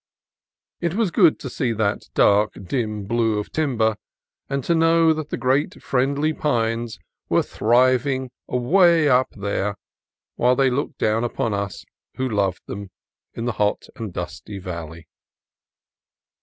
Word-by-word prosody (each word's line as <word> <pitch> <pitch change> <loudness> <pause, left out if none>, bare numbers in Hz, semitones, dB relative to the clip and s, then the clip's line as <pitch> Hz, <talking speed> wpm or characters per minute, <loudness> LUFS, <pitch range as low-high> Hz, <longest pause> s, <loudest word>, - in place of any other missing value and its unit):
It 170 0 -1
was 215 -4 +1
good 170 -3 +5
to - - -5
see 125 -1 -1
that 105 -2 -1
dark, 105 +1 +4
dim 105 0 -2
blue 115 0 +1
of 105 - -4
timber, 115 -8 +1 0.5
and 140 -1 -2
to 170 - +1
know 165 0 +4
that 155 -1 -5
the - - -3
great 135 +4 0
friendly 140 +4 +1
pines 115 -5 -1 0.3
were - - +3
thriving 130 +2 +2 0.2
away 165 +5 +4
up 130 -1 +3
there, 100 0 -2 0.6
while 125 +1 +3
they 135 0 +3
looked 140 +2 -2
down 110 +2 +1
on 115 - 0
us 100 -1 -4 0.3
who 130 - -1
loved 100 -5 -1
them, 100 0 -7 0.5
in 115 - -4
the 120 - 0
hot 105 0 0
and 110 -4 -6
dusty 90 +3 -6
valley. 85 -3 -7
120 Hz, 140 wpm, -22 LUFS, 105-140 Hz, 0.6 s, good